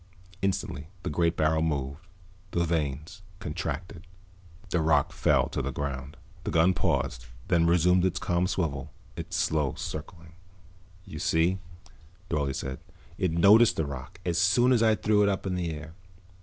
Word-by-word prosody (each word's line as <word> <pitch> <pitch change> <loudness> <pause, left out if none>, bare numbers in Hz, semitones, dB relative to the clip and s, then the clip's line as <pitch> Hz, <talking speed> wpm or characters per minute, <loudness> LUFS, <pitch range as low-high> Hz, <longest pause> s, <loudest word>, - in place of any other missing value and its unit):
Instantly 90 -6 -2 0.2
the - - -2
great 85 +2 +1
barrel 80 0 +2
moved, 70 -3 -1 0.5
the 85 -1 0
vanes 80 +3 -2 0.2
contracted. 90 0 -5 0.6
The 85 - +2
rock 80 -3 +3
fell - - +2
to - - -2
the 70 +1 -3
ground. 70 +2 -5 0.3
The - - -3
gun 85 +3 +4
paused, - - -1 0.2
then 85 -1 +4
resumed 90 +1 +4
its 95 -1 +1
calm 90 +1 +1
swivel, 80 -8 -2 0.2
its - - -4
slow 75 -2 0
circling. 80 -1 -7 0.7
"You - - -8
see," 85 +4 +2 0.7
Dorle 70 -4 0
said, 65 -1 -4 0.4
"it 95 -4 +1
noticed 100 +7 +6
the 80 - 0
rock, 70 +4 -8
as 85 -1 +1
soon 120 +8 +4
as 120 -3 +4
I 110 -1 +4
threw 105 0 +2
it 100 - +4
up 100 0 -2
in 95 - -1
the 90 -2 -1
air. 80 0 -7
85 Hz, 155 wpm, -28 LUFS, 75-90 Hz, 0.7 s, noticed